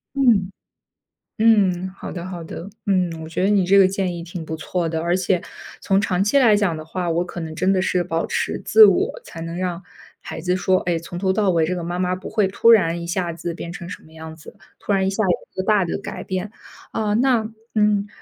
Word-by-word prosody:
嗯， 230 -9 +3 0.9
嗯， 195 -5 +3
好 - - -8
的 175 -1 -6
好 180 -2 -6
的， 165 +3 -8 0.2
嗯， 185 -3 +2
我 160 - -8
觉 165 - -2
得 195 - +3
你 200 -3 +3
这 195 +2 +5
个 195 -1 +7
建 190 -2 -2
议 170 - -6
挺 175 0 -7
不 160 0 -5
错 170 +1 -2
的， 160 0 -2
而 170 +2 +1
且 185 -1 +1 0.4
从 195 0 +2
长 190 -2 +1
期 210 +7 +2
来 230 -5 +5
讲 205 -5 +1
的 155 - -7
话， 175 +2 -3
我 170 +2 0
可 175 - -7
能 160 -1 -5
真 185 +4 +1
的 190 -1 +2
是 180 -1 +1
保 165 -1 -2
持 - - -2
自 440 - +8
我， - - +1
才 165 - -10
能 165 +1 -5
让 180 0 -3 0.4
孩 - - -7
子 180 +2 0
说， 185 0 +2
哎， 175 -1 -1
从 170 +1 -8
头 190 0 +1
到 200 +1 +1
尾 165 -2 +2
这 180 +3 -2
个 175 - -4
妈 175 +1 -3
妈 180 0 0
不 185 - -8
会 210 -3 +2
突 200 +4 +4
然 170 -6 +4
一 - - -5
下 175 0 -1
子 170 +1 -5
变 170 0 -7
成 170 0 -8
什 - - -9
么 155 - -19
样 160 0 -9
子， 160 - -14 0.2
突 - - -4
然 195 -1 +2
一 - - +1
下 200 +3 -1
子 190 - +1 0.2
一 - - -2
个 - - -6
大 205 -2 +3
的 170 - -2
改 - - -7
变， 190 +2 -4 0.4
啊， 215 -2 -1
那， 235 -1 +2 0.3
嗯， 210 -1 +2
185 Hz, 265 characters per minute, -21 LUFS, 170-200 Hz, 0.9 s, 自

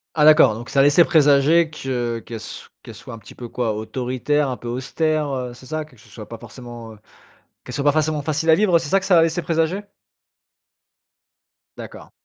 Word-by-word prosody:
Ah 150 -2 +3
d'accord, 150 -6 +6
donc 115 +3 -9
ça 140 - +2
laissait 145 +4 +5
présager 155 +2 +4
que 120 -5 -3
qu'elle 115 - -8
s - - -10
qu'elle - - -11
soit - - -11
un - - -10
petit 105 - -15
peu 120 - -8
quoi? 120 -2 -2
Autoritaire, 130 +6 -2
un 125 - -5
peu 120 - -10
austère, 150 +5 -1
heu, 125 -2 -4
c'est 125 - -15
ça? 155 +3 -4
Que 135 -5 -22
ce 110 - -20
soit 110 -3 -11
pas 115 - -8
forcément, 120 -1 -11 0.7
qu'elle - - -8
soit 140 - -3
pas 145 - +4
forcément 155 0 0
facile 155 +2 0
à - - +7
vivre. 180 -1 +3
C'est 160 -3 -6
ça 195 - +3
que 185 - -7
ça 175 -4 +5
laissait 165 +1 0
présager? 165 +3 -1 2.0
D'accord. - - -11
140 Hz, 200 wpm, -21 LUFS, 120-160 Hz, 2.0 s, à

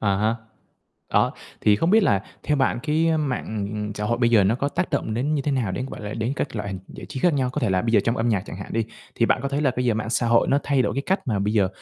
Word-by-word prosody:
À 100 -2 +2
há. 110 +3 +1 0.8
Đó, - - +3 0.3
thì 105 -1 +4
không 165 - +1
biết 220 +1 +6
là 100 - +2 0.2
theo 150 - +1
bạn 130 -2 +1
cái, 160 +2 +1
ơ, 160 - +3
mạng 105 -6 -3
xã 105 - -3
hội 120 +2 0
bây 120 -1 +3
giờ 110 -4 +5
nó 105 +4 +3
có 140 +3 -1
tác 180 +4 -2
động 110 - -1
đến 140 +6 0
như 140 - 0
thế 145 - 0
nào 120 -8 0
đến, 130 +7 -3
gọi - - -8
là, 105 0 -5
đến 115 +4 -1
các 130 - -3
loại 105 -1 -3
hình 95 -1 -4
giải - - -10
trí 135 -3 -6
khác 175 - +4
nhau? 130 -2 0
Có 150 - -3
thể 115 -6 +1
là 95 -1 +2
bây 115 -1 -1
giờ 105 - +6
trong 115 +1 +1
âm 115 +1 0
nhạc 100 -5 +1
chẳng - - -7
hạn 95 - -8
đi, 115 -1 +1 0.3
thì 115 - +2
bạn 125 - +2
có 140 - -1
thấy 140 +1 -1
là 140 -4 +3
bây 125 - 0
giờ 120 - +2
mạng 110 +1 -3
xã 120 -1 +1
hội 115 0 +4
nó 140 - +4
thay 140 -3 +2
đổi - - -1
cái 140 - -1
cách 190 +1 +1
mà 105 -5 0
bây 105 +2 0
giờ 100 -4 +3
120 Hz, 325 wpm, -24 LUFS, 105-140 Hz, 0.8 s, biết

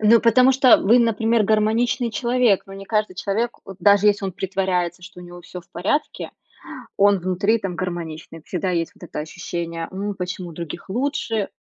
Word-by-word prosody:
Ну, 220 +2 +6
потому 250 +3 +5
что, 265 0 +3
э, - - +7
вы, 230 +5 +5
например, 230 -1 +2
гармоничный 220 +3 +1
человек, 235 -1 +2
но 195 - -11
не 195 0 -9
каждый 210 -2 -1
человек, 215 +5 -1
вот 195 - -10
даже 205 0 +4
если 205 -1 +3
он 190 - -3
притворяется, 180 -2 -2
что 180 0 -12
у - - -10
него 175 0 -11
всё 180 +1 -9
в 170 - -26
порядке, 210 - -2 0.7
он 200 0 +4
внутри 185 +5 +1
там 195 -5 -5
гармоничный, 165 -3 -6
всегда 180 +3 -3
есть 170 -2 -1
вот - - -13
это 150 - -5
ощущение: 170 +1 -5
ну, 200 +2 -3
почему 180 -1 -5
у - - -10
других 170 +2 -8
лучше- 225 -2 -1
195 Hz, 190 wpm, -22 LUFS, 180-225 Hz, 0.7 s, э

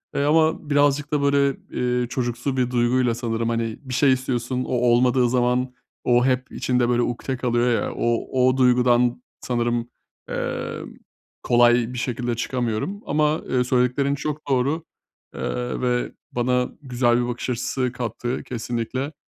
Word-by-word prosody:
Eee, 140 - +1
ama 155 0 +2
birazcık 145 0 +2
da 145 - +2
böyle, 140 -1 +3 0.2
eee, 125 0 0
çocuksu 120 +2 -2
bir 125 -1 +1
duyguyla 120 0 +2
sanırım, 115 -1 -2
hani, 115 -1 -2
bir 130 -3 -7
şey 135 +1 +4
istiyorsun, 130 -1 -2
o - - -4
olmadığı 125 +1 +3
zaman 125 +1 +1 0.3
o 120 0 +3
hep 130 -1 0
içinde 125 -1 0
böyle 120 0 +2
ukte 125 +2 -2
kalıyor 120 0 +1
ya, - - -4
o, 120 +2 +1
o 130 - 0
duygudan 125 -1 +3 0.2
sanırım, 120 -1 -1 0.4
emm, - - -4 0.5
kolay 120 0 +4
bir - - -5
şekilde 120 -1 -2
çıkamıyorum. 120 - -2
Ama, 150 +1 +1
eee, 125 -1 +2
söylediklerin 125 +3 +1
çok 150 +1 -5
doğru, 140 +5 +1 0.5
eee, 125 0 -3
ve 125 -1 0 0.2
bana 125 +1 +1
güzel 120 -3 +1
bir 120 - -1
bakış 120 +1 -4
açısı 125 +1 -1
kattı 120 +1 -4
kesinlikle. 125 +3 -3
125 Hz, 145 wpm, -23 LUFS, 120-130 Hz, 0.5 s, şey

